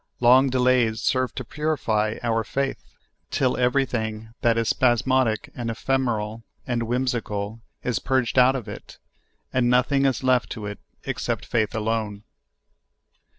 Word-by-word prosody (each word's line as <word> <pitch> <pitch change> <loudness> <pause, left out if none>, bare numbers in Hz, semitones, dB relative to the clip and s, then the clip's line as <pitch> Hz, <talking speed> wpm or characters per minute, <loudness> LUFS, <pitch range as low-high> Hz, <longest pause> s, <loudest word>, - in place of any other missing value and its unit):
Long 130 +3 +6
delays 125 -3 +2
serve 130 -1 0
to 130 - -5
purify 115 -7 -1
our 115 -1 +1
faith, 135 +6 -2 0.5
till 130 -2 +1
everything 120 -4 0
that 115 -1 +3
is 115 -1 +1
spasmodic 125 -2 +2
and 120 -2 -4
ephemeral 115 -3 -1 0.2
and 120 -2 -1
whimsical 115 -3 -2 0.2
is 125 - 0
purged 130 -1 +1
out 130 +2 +6
of 125 -5 -5
it, - - -9 0.6
and 125 -2 +2
nothing 135 +3 +3
is 130 0 -1
left 130 -3 +2
to 105 - -7
it 105 0 -6 0.2
except - - -3
faith 115 0 0
alone. 110 -2 -2
120 Hz, 135 wpm, -24 LUFS, 110-130 Hz, 0.6 s, Long